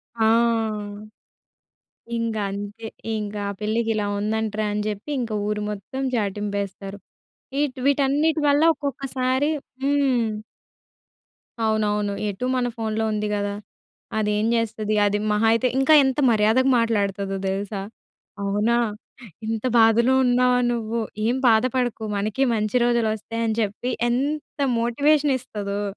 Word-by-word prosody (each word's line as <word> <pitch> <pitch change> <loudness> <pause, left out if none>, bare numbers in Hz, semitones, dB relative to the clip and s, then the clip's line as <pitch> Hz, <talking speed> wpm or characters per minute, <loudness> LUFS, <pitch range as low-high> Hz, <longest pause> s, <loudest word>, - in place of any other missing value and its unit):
ఆ! 220 -1 +2 1.9
ఇంగంతే, 210 -1 -3 0.3
ఇంకా 210 -1 -4 0.2
పిల్లకిలా 215 -1 0
ఉందంట్రా 215 0 -1
అని 210 0 -1
జెప్పి, 210 +7 -4
ఇంక 230 -2 -3 0.2
ఊరు 210 0 -1
మొత్తం 210 +6 -5
చాటింపేస్తారు. 200 -2 -3 0.6
ఈట్ 290 -3 -1
వీటన్నిటి 285 +3 +2
వల్ల 285 +2 +4
ఒక్కొక్కసారి 275 0 -1 0.3
హ్మ్. 270 -5 +2 1.4
అవునవును. 210 -2 0 0.2
ఎటూ 205 +6 -4
మన 250 -1 +1
ఫోనులో 220 0 -1
ఉంది 210 0 -1
గదా! 205 0 -2 0.6
అదేం 210 0 +1
జేస్తది? 220 -2 -1
అది 205 0 +1
మహా 210 +2 +2
అయితే 230 +2 +2
ఇంకా 270 +4 +4
ఎంత 265 +1 0
మర్యాదగా 220 +5 +3
మాట్లాడతదో 200 -3 0
దెలుసా? 195 +1 -3 0.6
అవునా! 210 +4 +1 0.7
ఇంత 225 -1 -2
బాధలో 230 +3 +5
ఉన్నావా 250 0 +3
నువ్వు? 230 0 -2 0.3
ఏం 240 +3 +2
బాధపడకు, 245 0 +2
మనకీ 215 +6 0
మంచి 215 +2 0
రోజులొస్తాయని 230 -1 0
జెప్పి, 215 +4 -2 0.2
ఎంత 285 +5 -2 0.2
మోటివేషనిస్తదో! 245 -5 0
225 Hz, 105 wpm, -23 LUFS, 210-250 Hz, 1.9 s, బాధలో